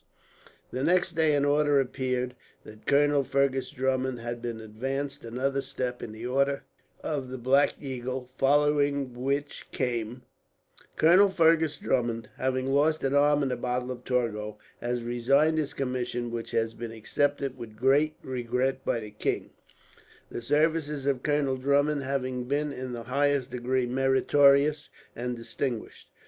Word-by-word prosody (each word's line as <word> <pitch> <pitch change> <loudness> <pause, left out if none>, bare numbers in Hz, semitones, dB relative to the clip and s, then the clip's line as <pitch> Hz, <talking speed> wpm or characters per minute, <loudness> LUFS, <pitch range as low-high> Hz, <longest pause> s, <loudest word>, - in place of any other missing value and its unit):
The 130 - -3
next 180 +2 +3
day 160 -2 +2
an 145 0 +2
order 145 0 +3
appeared, 125 -1 -1 0.3
that 110 0 -14
Colonel 145 0 +4
Fergus 135 -1 0
Drummond 130 -1 -1
had 120 0 -5
been 120 -2 -4
advanced 135 +6 -4
another 130 +4 -1
step 130 -2 -4
in 110 - -6
the 110 +2 -8
order 140 +2 +1 0.4
of 140 -4 -3
the 130 - -5
Black 130 +4 +3
Eagle, 130 -2 -5
following 140 -1 +2
which 140 +4 -3
came: 120 -1 -2 0.7
"Colonel 180 +5 +6
Fergus 160 -4 +3
Drummond, 120 -4 -1
having 130 0 0
lost 145 +4 +2
an 135 0 +1
arm 145 0 +4
at 135 - 0
the 125 - -1
battle 125 0 -2
of 125 -1 -7
Torgau, 105 -5 -1 0.2
has 120 0 -2
resigned 135 +7 +2
his 150 -3 -3
commission; 125 -2 -2
which 115 -1 -4
has 115 0 0
been 115 0 -6
accepted 140 +4 -1
with 110 -2 -9
great 140 +5 +3
regret 130 +1 -1
by 115 - 0
the 105 -1 -8
king, - - -2 0.8
the - - -5
services 150 +1 +1
of 135 -3 +1
Colonel 145 -2 +1
Drummond 140 +2 +2
having 130 -2 -2
been, 145 +2 -1
in 130 -1 -5
the 120 -1 -5
highest 140 +1 +1
degree, 125 +1 0
meritorious 140 +3 +3 0.3
and 125 +1 -3
distinguished." 120 0 -5
130 Hz, 150 wpm, -28 LUFS, 125-145 Hz, 0.8 s, Colonel